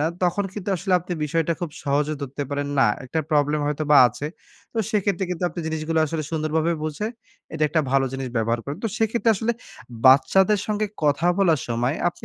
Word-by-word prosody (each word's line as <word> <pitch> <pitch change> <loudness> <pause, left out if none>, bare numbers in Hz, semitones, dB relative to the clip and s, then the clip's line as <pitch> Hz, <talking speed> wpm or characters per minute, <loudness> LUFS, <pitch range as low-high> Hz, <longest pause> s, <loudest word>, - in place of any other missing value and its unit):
না, 150 - +2 0.2
তখন 180 +3 +1
কিন্তু 205 -1 -6
আসলে 185 +2 -2
আপনি 180 +1 -6
বিষয়টা 165 +2 0
খুব 170 -3 -3
সহজে 145 +1 0
ধরতে 140 +1 -4
পারেন, 145 0 -2
না, 135 - +6 0.2
একটা 145 +6 -3
প্রবলেম 150 0 +2
হয়তোবা 150 0 +2
আছে। 130 +5 -6 0.5
তো 230 - -3
সেক্ষেত্রে 200 -3 0
কিন্তু 180 0 -4
আপনি 175 - -6
জিনিসগুলো 160 0 -1
আসলে 155 +1 -3
সুন্দরভাবে 160 +1 0
বুঝে, 155 +7 -3 0.5
এটা 155 -1 -3
একটা 160 +1 +2
ভালো 135 0 +3
জিনিস 135 -1 -4
ব্যবহার 115 +1 0
করেন। 140 +2 -5
তো - - +1
সেইক্ষেত্রে 225 +1 +1
আসলে 230 +4 0 0.5
বাচ্চাদের 185 +10 +5
সঙ্গে 215 0 0 0.2
কথা 145 +4 +2
বলার 165 -7 +3
সময়, 120 +4 0
আপনি - - -10
155 Hz, 185 wpm, -23 LUFS, 145-180 Hz, 0.5 s, না